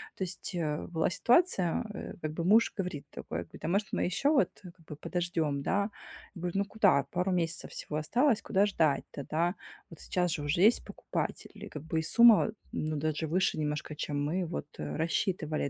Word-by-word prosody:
то - - -3
есть, 185 +1 -6
э, 150 -3 -2
была 160 -2 +1
ситуация, 235 - +3
э, - - -6
как 155 - -2
бы 165 +2 -3
муж 220 +5 +5
говорит 180 -7 -3
такой, 80 - -5
а, - - -5
говорит: - - -11
"А - - 0
может, 195 +4 0
мы - - +1
еще 190 +11 +1
вот, 295 -3 +4
как 175 -2 -13
бы, 150 - -7
подождем, 165 -3 -1
да?" 200 +7 0 0.5
Я 175 - -8
говорю: 175 -1 -2
"Ну 200 +1 +2
куда? 200 -9 +3
Пару 180 +2 0
месяцев 170 -2 -1
всего 150 - -5
осталось, 235 - +2
куда 200 -1 +2
ждать-то, 155 -7 0
да? 170 +3 +1 0.4
Вот 165 - -12
сейчас 180 -1 0
же 160 - -2
уже 145 +4 0
есть 220 +5 +5
покупатель, - - -4
и - - -6
как 150 - -8
бы 160 0 -1
и - - -1
сумма, 225 +6 +6 0.2
ну, 155 0 -2
даже 155 +1 -1
выше 175 0 +1
немножко, 150 0 -2
чем 145 -1 -2
мы 180 +2 -1
вот, 165 -3 -4
э, - - -4
рассчитывали, 160 -2 -1
170 Hz, 205 wpm, -30 LUFS, 155-195 Hz, 0.5 s, сумма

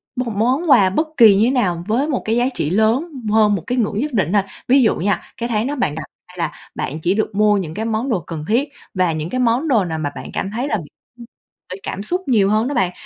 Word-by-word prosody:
một 245 -3 -2
món 255 +10 +1
quà 205 -9 +6
bất 310 - 0
kỳ 220 -6 +8
như 205 +3 +4
thế 245 - +2
nào 180 -10 0
với 245 +7 +1
một 275 -5 -1
cái 220 - +1
giá 240 +1 +2
trị 150 - -2
lớn 220 - +1 0.2
hơn 215 -1 +4
một 175 - -5
cái 250 - -1
ngưỡng 210 -3 0
nhất 295 +3 -2
định 190 -5 0
ha. 200 -2 +3 0.2
Ví 265 +2 +5
dụ 225 - +3
nha, 190 -1 0 0.2
cái 235 +1 -3
tháng 220 +1 0
đó 290 - -2
bạn 240 - -1
đặt 160 - -5 0.2
ra 180 - -17
là 165 -3 -1 0.2
bạn 150 +4 -4
chỉ 175 +3 +1
được 215 0 -2
mua 210 0 +4
những 170 -5 -4
cái 220 +6 -3
món 225 +4 -1
đồ 215 -7 +1
cần 165 -2 -7
thiết 250 +7 +1 0.2
và 185 -3 +1
những 155 +1 -4
cái 255 - -2
món 250 +5 +1
đồ 225 -9 +3
nào 160 -2 -3
mà 145 -2 -2
bạn - - -8
cảm 195 - -2
thấy 240 +6 -2
là 220 - 0 0.9
bởi 185 - -7
cảm 200 - -5
xúc 360 - -2
nhiều 210 -7 +3
hơn 215 +3 +2
đó 285 - -2
bạn. 185 -8 +1
215 Hz, 270 wpm, -19 LUFS, 185-250 Hz, 0.9 s, kỳ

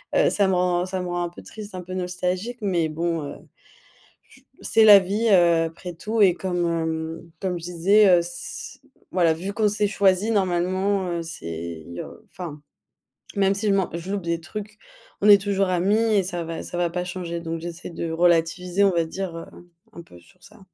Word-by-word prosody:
heu, - - +4
ça 200 -2 +2
me 190 - +2
rend 180 0 +1
ça 185 0 -3
me 180 - -4
rend 175 0 -2
un 175 - -3
peu 175 - -13
triste, 210 -3 -10
un 185 - -5
peu 185 - -8
nostalgique, 185 +5 -3
mais 175 -5 0
bon, 165 +1 -2
heu, 140 - -6 0.9
j - - -21 0.2
c'est 225 0 +4
la 205 -2 +10
vie, 205 +5 -1
heu, 170 -4 +5
après 170 +2 -6
tout 215 +6 -3
et 185 -3 +6
comme 180 -2 -2
hem, 165 0 -3
comme 180 -2 -2
je - - -10
disais, 185 +5 +4
heu, 180 - +6
s 175 0 -7 0.3
voilà 170 -3 +3
vu 185 +5 -5
qu'on 215 0 +2
s'est 210 0 0
choisis, 200 +1 +2
normalement, 185 0 0
heu, 170 -1 -2
c'est 85 - -7
il - - -10
y - - -6
a, - - -7 0.2
enfin. 160 -5 -7 0.8
Même 195 -1 +3
si 210 +2 -2
je 200 - +3
m'en 195 -2 +1
je 170 +3 -5
loupe 200 - -2
des 170 0 -1
trucs, 210 +4 -8 0.4
on 205 - +3
est 205 -1 +8
toujours 195 -1 0
amis 185 +4 +2 0.2
et 200 -2 +3
ça 175 -2 -4
va 165 0 -5
ça 175 - -6
va 175 -1 +1
pas 180 +1 -3
changer, 175 -2 -5
donc 165 0 -4
j'essaie 170 +1 -7
de 170 -1 -4
relativiser, 175 +3 +2
on 195 - +4
va 170 -2 +1
dire, 175 +1 -5
heu, 165 - -7 0.5
un 170 - -9
peu 90 - -16
sur 130 - -24
ça. 210 +3 -17
180 Hz, 215 wpm, -24 LUFS, 170-195 Hz, 0.9 s, la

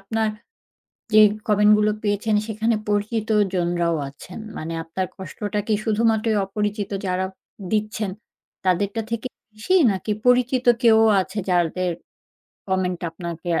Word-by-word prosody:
আপনার 220 +2 -1 0.8
যে 215 - +9 0.3
comment 210 0 +5
গুলো 210 0 +3
পেয়েছেন 210 +1 0
সেখানে 220 +1 0
পরিচিতজনরাও 205 -6 +1
আছেন? 150 +8 -11 0.2
মানে 165 +1 -5
আপনার 185 +3 -3
কষ্টটা 205 +3 -4
কি 215 - +2
শুধুমাত্রই 220 0 +2
অপরিচিত 210 +1 -2 0.2
যারা 185 +1 0 0.5
দিচ্ছেন, 215 -1 -1 0.5
তাদেরটা 200 +4 +1
থেকে 230 +2 -3 0.3
বেশি? 215 +13 -1 0.2
নাকি 195 +3 -4 0.2
পরিচিত 250 0 +3 0.2
কেউ 225 -2 +6 0.2
আছে 200 +3 -5
যাদের 180 +1 +1 0.8
comment 185 -2 0
আপনাকে 170 0 -7
আ - - +1
210 Hz, 120 wpm, -22 LUFS, 185-220 Hz, 0.8 s, যে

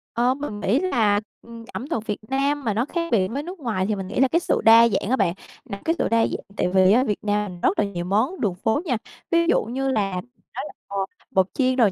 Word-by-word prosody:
Ờ, 245 +2 +3
mình 265 -7 -6
nghĩ 215 +6 +2
là, 225 - +2 0.2
ừm, 230 -1 -11
ẩm 265 - -5
thực 225 -10 -2
Việt 210 - -1
Nam 280 +2 0
mà 220 -4 0
nó 230 +5 0
khác 335 +1 -3
biệt 190 -4 +3
với 280 +3 -3
nước 360 +1 -8
ngoài 215 -8 -1
thì 215 - 0
mình 190 -1 -5
nghĩ 225 - -3
là 270 - +5
cái 330 +6 +2
sự - - 0
đa 230 +1 +8
dạng 200 0 -1
á 260 - +3
bạn. 170 -9 +1 0.3
Là 200 -6 -7
cái 330 +1 +2
sự - - +1
đa 230 - +3
dạng - - -5
tại - - +1
vì 185 0 +5
á, 245 +5 +5
Việt 210 -6 -1
Nam 205 -4 -2
rất - - +2
là 210 - +3
nhiều 175 -3 -4
món 220 - 0
đường 195 -5 0
phố 220 - 0
nha, 250 -7 0 0.3
ví 335 0 +3
dụ - - +3
như 265 +4 -2
là 200 -5 0
mình 245 - -23 0.3
nói - - -3
là, - - -10 0.2
ờ, 200 - -5 0.3
bột 190 -1 +3
chiên, 255 -1 +1
rồi 230 -6 +4
230 Hz, 270 wpm, -23 LUFS, 200-270 Hz, 0.3 s, đa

